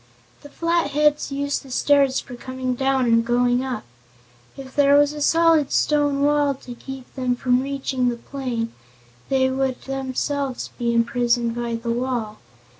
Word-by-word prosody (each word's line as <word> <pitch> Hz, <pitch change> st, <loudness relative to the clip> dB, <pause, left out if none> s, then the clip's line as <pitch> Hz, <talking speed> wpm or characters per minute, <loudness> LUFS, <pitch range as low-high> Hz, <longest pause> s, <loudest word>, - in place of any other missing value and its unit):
"The 290 Hz, -, -12 dB
Flatheads 300 Hz, -3 st, +1 dB
use 280 Hz, +1 st, -1 dB
the 270 Hz, -, -14 dB
stairs 275 Hz, +1 st, +3 dB
for 250 Hz, -, -10 dB
coming 255 Hz, +1 st, -4 dB
down 265 Hz, 0 st, +1 dB
and 230 Hz, -1 st, +3 dB
going 245 Hz, +1 st, +2 dB
up. 260 Hz, -, -4 dB, 0.7 s
If 265 Hz, -1 st, -10 dB
there 285 Hz, -1 st, +5 dB
was 290 Hz, 0 st, +3 dB
a 300 Hz, -, -6 dB
solid 325 Hz, -2 st, +3 dB
stone 290 Hz, -2 st, +2 dB
wall 290 Hz, -1 st, +2 dB
to 250 Hz, -1 st, -10 dB
keep 265 Hz, +1 st, -10 dB
them 255 Hz, -2 st, -1 dB
from 250 Hz, 0 st, +1 dB
reaching 265 Hz, -2 st, -1 dB
the 240 Hz, -, -3 dB
plain 235 Hz, -3 st, -4 dB, 0.6 s
they 260 Hz, -1 st, +2 dB
would 265 Hz, -1 st, -2 dB
themselves 270 Hz, 0 st, -3 dB
be 235 Hz, -1 st, +1 dB
imprisoned 235 Hz, 0 st, +1 dB
by 235 Hz, 0 st, -3 dB
the 230 Hz, 0 st, -3 dB
wall. 235 Hz, -3 st, -2 dB
265 Hz, 155 wpm, -22 LUFS, 245-280 Hz, 0.7 s, there